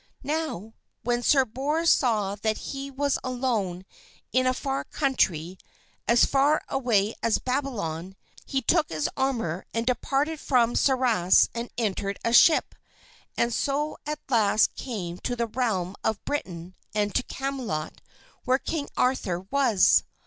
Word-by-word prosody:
Now, 290 - -3 0.3
when 240 +1 0
Sir 270 +1 +4
Bors 290 +8 +1
saw 215 -6 +2
that 215 +1 -1
he 275 0 -6
was 280 +1 -1
alone 230 -8 -2 0.5
in 255 +1 +3
a 255 - +3
far 270 +1 -2
country, 185 - -1 0.5
as 235 +1 +5
far 280 +3 +2
away 230 -6 +1
as 230 -2 +2
Babylon, 205 - -3 0.3
he 270 -1 -2
took 325 +5 +2
his 155 -2 -1
armor 230 -11 -1
and 230 0 0
departed 275 +5 0
from 240 -4 +2
Sarras 245 -9 +3
and 235 +1 -4
entered 200 -3 -1
a 230 - +1
ship, 315 +6 +6 0.6
and 235 0 +1
so 290 +4 -1
at 300 0 -2
last 220 -4 +3
came 180 -8 -5
to 245 - -3
the 235 -1 0
realm 210 -6 -2
of 220 -2 -1
Britain 180 - -4 0.2
and 205 -1 0
to - - +2
Camelot 255 - -4 0.4
where 260 -1 +3
King 290 +1 -4
Arthur 210 -9 0
was. 265 -8 +4
240 Hz, 140 wpm, -26 LUFS, 200-270 Hz, 0.6 s, ship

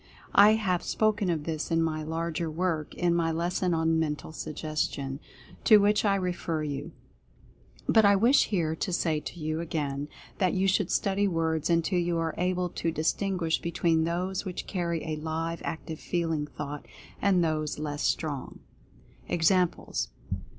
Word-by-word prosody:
I 210 +2 +8
have 185 -5 0
spoken 210 -2 +1
of 160 -3 0
this 155 -1 -3
in 165 -1 +2
my 155 -1 -1
larger 165 +1 -2
work, 160 -1 -2
in 175 -1 +2
my 165 -1 +1
lesson 175 +2 0
on 160 0 +2
"Mental 150 -1 -2
Suggestion," 150 -3 -3 0.5
to 215 - +9
which 205 0 +3
I 200 -1 +4
refer 175 -4 -2
you. 145 +2 -4 0.9
But 220 - +5
I 200 0 +6
wish 235 +8 +5
here 165 -6 0
to 185 - -3
say 160 -3 +1
to 175 - -8
you, 155 0 -2
again, 145 -4 -2 0.3
that 185 -2 +2
you 190 +1 +2
should 190 -1 +2
study 200 +1 +1
words 160 -3 0
until 170 +2 +2
you 175 -1 0
are 165 -1 -1
able 180 0 0
to 165 - -2
distinguish 165 +1 0
between 170 -1 +1
those 180 +3 -1
which 185 -3 -5
carry 170 -4 -2
a 155 -1 -2
live, 165 +1 -3
active, 160 -1 -5
feeling 165 -4 -1
thought, 145 -1 -7 0.3
and 190 -3 +3
those 155 -2 -1
less 150 -1 -4
strong. 145 -5 -2 0.7
EXAMPLES. 175 +1 +1
165 Hz, 155 wpm, -28 LUFS, 155-185 Hz, 0.9 s, to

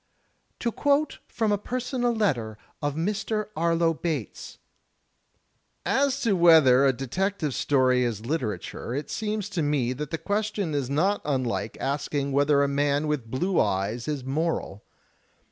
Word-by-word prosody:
To 235 - 0
quote 285 +4 +1
from 220 -2 -1
a 205 - +1
personal 245 +2 -1
letter 130 - 0 0.2
of 145 -1 -1
Mr. 210 +5 -2
Arlo 165 0 +2
Bates: 150 - -4 1.3
"As 275 0 +2
to 220 -5 +2
whether 155 -7 +6
a - - +5
Detective 150 +5 -2
Story 130 -3 +2
is 115 -3 -3
literature, 120 - -3
it 145 - -4
seems 210 -2 -2
to 185 -5 -2
me 145 -5 +1
that 150 +2 -5
the 165 - -2
question 205 -3 -2
is 140 -3 -1
not 180 +9 +1
imlike 130 -6 -2
asking 140 0 -2
whether 140 +1 +3
a - - +2
man 145 +1 +1
with 150 -7 -2
blue 175 +10 0
eyes 105 +6 0
is 145 -4 -2
moral. 135 -7 -2
150 Hz, 145 wpm, -26 LUFS, 130-200 Hz, 1.3 s, whether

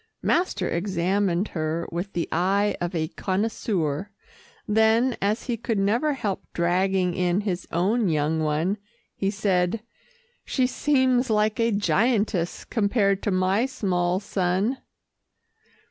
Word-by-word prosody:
Master 360 +2 +1
examined 185 +1 0
her 160 +1 -2
with 175 +4 -4
the 170 - -1
eye 195 +4 +1
of 175 0 -2
a 160 -1 -1
connoisseur, 190 -4 -2 0.6
then 220 +4 +3
as 210 +3 0
he 240 -3 -2
could 225 -1 -2
never 230 +10 +2
help 210 -8 -3
dragging 180 +1 +1
in 180 +1 +1
his 190 -4 -3
own 200 +5 +1
young 155 0 +1
one, 155 +6 0 0.4
he 195 - -1
said, 195 0 0 0.6
"She 260 - +1
seems 260 -2 +2
like 215 0 +1
a 230 0 +2
giantess 205 -3 +1
compared 200 -3 +1
to - - -1
my 190 +5 +2
small 180 -6 0
son." 195 +5 -1
195 Hz, 125 wpm, -25 LUFS, 175-220 Hz, 0.6 s, then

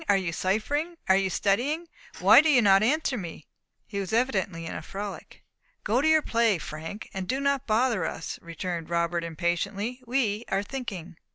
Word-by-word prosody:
are 200 - +5
you 185 -3 -2
ciphering? 290 - -1
are 190 - +6
you 195 0 +2
studying? 265 - 0 0.3
Why - - +8
do 315 - +1
you 270 -5 +6
not 195 -1 +6
answer 270 +1 +1
me?" 165 -4 -8 0.4
He 200 - -5
was 195 -2 -4
evidently 200 -8 0
in - - -5
a - - -5
frolic. 200 +1 -7 0.4
"Go 235 +5 +2
to 305 - +2
your 315 -1 +5
play, 230 -4 +2
Frank, 160 +6 -7
and 190 -1 -4
do 265 - -1
not 280 -1 0
bother 225 -3 +2
us," 160 - -4
returned 170 0 -5
Robert, 170 0 0
impatiently; 195 +8 -2
"we 235 -4 0
are 195 +1 0
thinking." 195 -9 -6
200 Hz, 180 wpm, -27 LUFS, 180-255 Hz, 0.4 s, Why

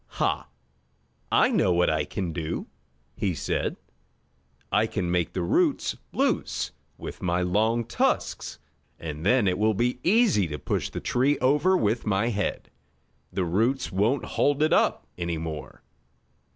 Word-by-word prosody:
"Ha! - - 0 0.8
I - - +5
know 90 - +3
what 90 0 +3
I - - 0
can 90 -4 -4
do!" 80 -2 -3 0.5
he 100 -5 -1
said. - - -2 0.9
"I 110 - +3
can 90 -5 -2
make 90 -2 0
the 90 - -1
roots 85 - +1 0.2
loose - - 0 0.3
with - - -8
my 90 0 +1
long 110 +6 +1
tusks, - - -1 0.4
and 80 -1 -6
then 115 +2 +3
it 90 +1 +1
will 110 0 +3
be 120 +4 0
easy 195 - +4
to 75 -1 -5
push - - -2
the - - -6
tree 135 +4 +2
over 150 +8 +3
with 110 - 0
my 105 +3 +2
head. 105 -4 -2 0.6
The 95 - -1
roots 115 +10 +1
won't 110 +6 +1
hold 145 +6 +1
it 155 - +3
up - - +2
any 85 -1 -2
more!" 80 -5 -6
100 Hz, 150 wpm, -26 LUFS, 85-125 Hz, 0.9 s, I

